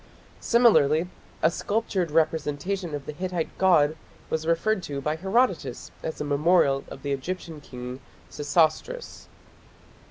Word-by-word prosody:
Similarly 180 - +4 0.4
a - - +5
sculptured 200 -3 -1
representation 160 +3 0
of 140 -2 -6
the - - -4
Hittite 175 +1 -3
god 160 -5 +4 0.4
was 160 0 -1
referred 185 +5 +1
to 145 -5 -4
by 150 +3 -1
Herodotus 190 - 0
as 160 - -5
a - - -1
memorial 145 -1 +3
of - - -10
the 140 - -2
Egyptian 160 +2 -4
king 125 -1 -8 0.3
Sesostris. 160 - 0
160 Hz, 125 wpm, -26 LUFS, 145-185 Hz, 0.4 s, a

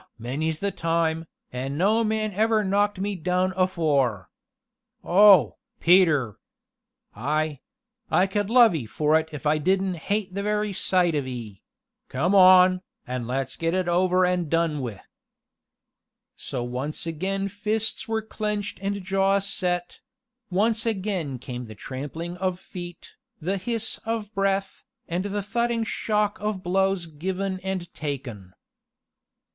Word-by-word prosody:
many 135 +8 -2
's 155 - -5
the 200 +4 -1
time, 165 -1 0 0.3
an' 135 +3 -3
no 215 +6 +3
man 215 -1 -1
ever 220 +2 +2
knocked 205 +1 +1
me 205 +1 -1
down 180 +2 0
afore. 145 - +1 0.7
Oh, 190 - +6 0.2
Peter! 160 - +4 0.8
I 150 +5 -1 0.5
I 185 - +4
could 205 +1 -1
love 235 -3 +6
'ee 140 -9 -3
for 150 +9 +2
it 160 0 -6
if 150 0 -8
I 150 +1 +3
didn't 190 +2 +1
hate 200 -2 0
the 200 - -2
very 210 0 -1
sight 180 -2 +2
of 145 -3 -1
'ee 115 -6 -7 0.5
come 170 +9 0
on, 185 -1 +7 0.2
an' 125 -2 -4
let's 135 +2 -2
get 165 +1 -1
it 185 -1 0
over 180 +1 +3
an' 180 -3 0
done 165 -1 +1
wi'." 115 -8 -5 1.3
So 120 - -4
once 130 +7 -4
again 190 +5 -2
fists 215 +5 -2
were 225 -1 -1
clenched 210 -2 -3
and 200 0 -2
jaws 195 +1 +1
set 175 -2 -2 0.5
once 215 +4 +2
again 190 - -2
came 125 0 -7
the 110 -1 -10
trampling 150 - -6
of 185 -1 -1
feet, 175 -2 -9 0.3
the 190 +5 -1
hiss 225 +3 -3
of 225 -1 -3
breath, 195 -1 -1 0.2
and 175 +3 -2
the 205 0 -2
thudding 235 +2 0
shock 210 -1 -1
of 210 -3 -3
blows 190 0 +1
given 185 +4 -3
and 185 -2 -4
taken. 120 -11 -6
185 Hz, 140 wpm, -25 LUFS, 155-200 Hz, 1.3 s, on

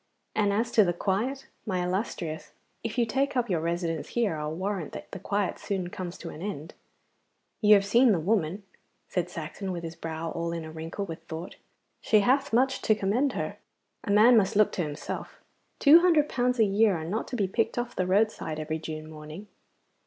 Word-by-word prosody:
And 205 -2 +2
as 230 +4 0
to 220 - +6
the 175 -2 +1
quiet, 220 +10 -1 0.2
my 185 -4 -1
illustrious, 180 -4 -3 0.3
if 230 +1 -4
you 240 - +3
take 265 +4 0
up 240 -4 0
your 170 - +2
residence 165 -1 -2
here 230 -8 0
I'll 150 0 -3
warrant 185 0 -3
that - - -9
the 195 - -6
quiet 200 +1 -1
soon 190 -3 -3
comes 180 -1 -6
to - - -7
an 155 - -10
end.' 175 -6 -5 0.9
'You 210 -1 +8
have 200 -1 +3
seen 235 +4 +5
the 185 - +2
woman,' 190 +1 0 0.5
said 180 -1 -1
Saxon, 175 +3 -5
with 170 -2 -5
his 165 0 -6
brow 165 0 -5
all 170 0 -3
in 165 -1 -4
a 160 - -8
wrinkle 165 +5 -5
with 165 -4 -7
thought. 165 +3 -7 0.4
'She 215 -2 +3
hath 265 +6 +2
much 260 +3 +2
to 215 - +3
commend 225 +8 +1
her. - - -3 0.5
A - - -6
man 215 +4 +7
must 215 -1 +3
look 215 0 +4
to - - -2
himself. 150 -3 -5 0.4
Two 310 +4 +8
hundred 330 -4 +4
pounds 250 -1 0
a 225 - +5
year 205 -1 +3
are 160 - -5
not 205 +7 -2
to 250 - -5
be 205 -5 +1
picked 225 +6 -1
off 240 0 -3
the 185 - 0
roadside 190 -5 +1
every 155 +1 -3
June 155 -1 -6
morning. 155 +6 -10
195 Hz, 205 wpm, -28 LUFS, 165-225 Hz, 0.9 s, You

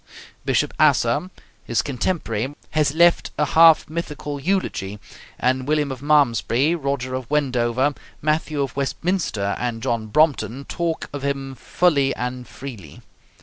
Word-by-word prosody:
Bishop - - +1
Asser, 185 - +3 0.3
his 115 - 0
contemporary, 135 - -2 0.2
has 150 -1 +1
left 170 +1 +4
a 150 - +2
half 160 +2 +6
mythical 150 -3 -5
eulogy, 140 - -1 0.4
and 130 +1 0
William 150 -2 +1
of 130 -1 -7
Malmesbury, 145 -1 +3
Roger 140 -5 -2
of 130 -2 -4
Wendover, 130 -2 +1 0.3
Matthew 150 -1 0
of 135 - -5
Westminster, 140 - -1
and 120 -2 -3
John 115 -4 -1
Brompton 140 0 +1
talk 170 -2 -3
of 145 - -4
him 135 -1 -2
fully 140 +1 +1
and 125 0 -4
freely. 110 - -10
140 Hz, 130 wpm, -22 LUFS, 125-155 Hz, 0.4 s, half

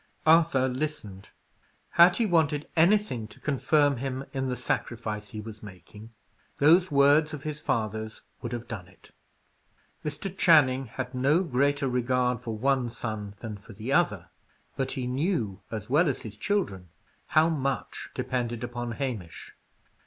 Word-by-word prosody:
'" - - -36
Arthur 160 -6 +2
listened. 125 -8 -5 0.6
Had 175 +1 +6
he 235 - +2
wanted 155 -6 +1
anything 170 - +3
to 105 - -16
confirm 145 0 +2
him 135 +1 -4
in 135 -1 -1
the 125 - -1
sacrifice 110 -3 -3
he 110 - -7
was 110 0 -9
making, 105 +2 -12 0.5
those 170 +6 +5
words 145 +2 +4
of 140 - -10
his 150 -1 -4
father's 110 -3 -2 0.2
would 120 - -5
have 120 -1 -5
done 100 -6 -7
it. 95 - -20 0.9
Mr. 165 +6 -4
Channing 135 -8 +4
had 125 +3 -6
no 140 +8 +2
greater 140 -1 +1
regard 125 -1 +1
for 115 -3 -5
one 130 0 +1
son 110 -3 -5
than 110 -3 -5
for 100 +3 -14
the 110 +7 -4
other; - - +1 0.4
but 135 -1 -2
he 130 - -3
knew, 125 - -1
as 105 -2 -5
well 150 +5 +3
as 135 - -3
his 105 -2 -8
children, 105 - -2 0.5
how 155 +1 +7
much 140 -4 -3
depended 120 -2 -2
upon 120 -1 -4
Hamish. 110 - -5
130 Hz, 150 wpm, -27 LUFS, 110-150 Hz, 0.9 s, how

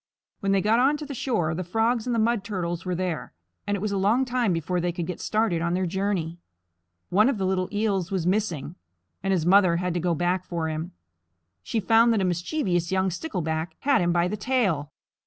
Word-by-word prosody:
When 195 -3 0
they 195 -1 +3
got 220 +4 +3
onto 295 +4 +2
the 285 - -6
shore, 215 -11 -1
the 180 +3 -3
Frogs 225 +6 0
and 245 - 0
the - - 0
Mud 225 -1 +1
Turtles 175 -4 -3
were 180 -1 -1
there, 175 - -3 0.3
and 205 0 0
it - - -7
was 210 0 -1
a 200 - 0
long 220 +7 +3
time 245 -4 +1
before 175 +1 -1
they 175 0 0
could 175 0 -4
get 180 0 -5
started 215 -6 0
on 170 +1 0
their 185 0 0
journey. 175 -2 -2 0.7
One 215 +7 +4
of 275 - -1
the 190 - -1
little 185 -1 0
Eels 205 -4 0
was 190 -4 -1
missing, 180 -6 -1 0.5
and 195 - -1
his 175 -4 +1
mother 185 -1 +5
had 180 0 -1
to 175 - -1
go 175 0 0
back 175 +3 0
for 170 -3 -3
him. 160 +1 -4 0.7
She 225 - -2
found 225 +3 +4
that 215 - +1
a - - +1
mischievous 175 - -1
young 190 0 +1
Stickleback 160 - -3
had 280 -5 +3
him 175 0 +2
by 175 0 +2
the 205 - -2
tail. 200 - 0
185 Hz, 220 wpm, -25 LUFS, 175-220 Hz, 0.7 s, mother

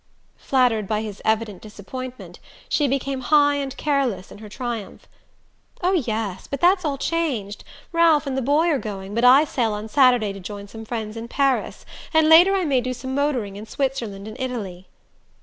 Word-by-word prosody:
Flattered 245 -6 +1
by 215 +1 -1
his 210 -2 -7
evident 220 -3 -1
disappointment, 245 +5 -9 0.3
she 295 - +1
became 275 0 -2
high 290 +2 +4
and 275 -1 -4
careless 270 -11 -1
in - - -11
her 215 -1 -10
triumph. 235 -2 -6 0.8
"Oh, 365 - +3
yes, 220 - -2
but 280 - -4
that's 365 +2 +4
all 290 -3 -1
changed. 265 -11 -2 0.3
Ralph 335 -3 +4
and 275 -2 -3
the 265 - 0
boy 290 +6 +2
are 290 -5 +1
going, 200 -3 -6
but 235 +2 0
I 260 +4 +7
sail 240 -7 -1
on 210 +1 -5
Saturday 245 -5 +3
to 195 - -9
join 200 +2 -8
some 225 +2 -10
friends 220 -1 -5
in 225 +1 -6
Paris 275 +1 0 0.3
and 315 -1 +5
later 350 +5 +7
I 375 -2 0
may 270 -4 +2
do 255 +1 -3
some 260 +2 -6
motoring 260 -8 -1
in 215 +2 -9
Switzerland 230 -7 -3
an 220 - -8
Italy." 205 -8 -5
250 Hz, 185 wpm, -22 LUFS, 215-280 Hz, 0.8 s, I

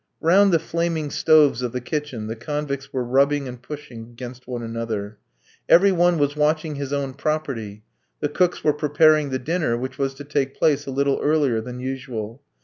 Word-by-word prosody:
Round 195 +4 +5
the 170 - +5
flaming 165 -2 -2
stoves 150 -6 +4
of 125 -2 -3
the 125 - -2
kitchen 135 -4 -4
the 110 +1 -4
convicts 140 +2 -4
were 130 - -1
rubbing 140 +3 +2
and 125 -1 -8
pushing 130 -4 -8
against 120 +2 -10
one 120 -2 -4
another. 110 -3 -4 0.5
Every 195 +3 +7
one 175 -1 +3
was 145 -1 +1
watching 155 +1 +1
his 140 -1 -5
own 140 -2 -2
property. 135 -8 -3 0.4
The 145 - -1
cooks 180 +4 +1
were 150 - +3
preparing 150 0 +3
the 130 - -1
dinner, 155 -3 -1
which 130 +2 -6
was 135 -1 -1
to 145 - -9
take 140 -2 -1
place 145 -2 +2
a - - -3
little 140 +1 +1
earlier 145 -7 +2
than 125 +2 -7
usual. 130 -2 -5
140 Hz, 185 wpm, -23 LUFS, 125-155 Hz, 0.5 s, Every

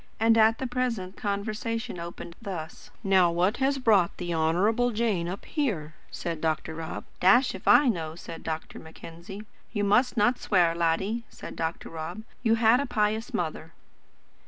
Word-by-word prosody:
And 225 +1 +5
the 225 +3 +4
present 240 -7 -2
conversation 215 0 -3
opened 170 0 -8
thus: 175 -7 -7
"Now 190 -3 +4
what 180 +6 +1
has 275 +1 +1
brought 210 -9 +3
the 175 -1 -3
Honourable 190 +10 +2
Jane 215 -7 0
up 190 - -6
here?" 200 - -2 0.2
said 165 -2 -5
Dr. 160 0 -1
Rob. 160 0 -6 0.2
"Dashed 245 +8 +5
if - - -10
I 290 - +7
know," 165 -8 -1
said 165 -1 -9
Dr. 160 0 -5
Mackenzie. 170 +5 -10 0.3
"You 205 -2 -1
must 245 +5 +3
not 240 +4 +3
swear, 175 -5 +3
laddie," 170 +7 0
said - - -9
Dr. 165 0 -3
Rob; 165 +6 -6 0.2
"you 225 -2 +3
had 225 +2 +4
a 280 - -1
pious 220 +2 0
mother." 165 -5 -3
200 Hz, 160 wpm, -27 LUFS, 170-230 Hz, 0.3 s, I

